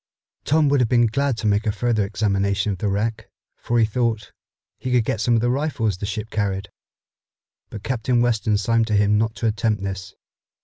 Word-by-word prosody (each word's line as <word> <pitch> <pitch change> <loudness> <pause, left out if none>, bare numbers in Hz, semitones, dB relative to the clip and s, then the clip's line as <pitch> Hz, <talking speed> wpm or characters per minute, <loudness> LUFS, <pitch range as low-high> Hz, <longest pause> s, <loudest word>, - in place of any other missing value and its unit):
Tom 155 +1 +3
would 140 0 +3
have 120 -3 +2
been 120 -1 +4
glad 135 +2 0
to 115 - -5
make 105 +2 +1
a - - +3
further 110 0 0
examination 100 -1 0
of 95 - -5
the 105 - -1
wreck, 105 +3 -2 0.3
for 120 - -2
he 115 - +5
thought 115 -1 -1 0.5
he 130 - -4
could 120 -3 +3
get 110 - -1
some 120 +1 +2
of 115 - +2
the 120 - +1
rifles 125 - -1
the 100 - -3
ship 105 +2 -5
carried, 100 -2 -2 1.0
but 105 - -8
Captain 125 -1 0
Weston 110 -3 +1
signed 115 +2 +1
to 110 - +1
him 105 +1 +3
not 110 0 -1
to - - -4
attempt 110 -1 0
this. 95 -1 -5
110 Hz, 205 wpm, -22 LUFS, 105-120 Hz, 1.0 s, he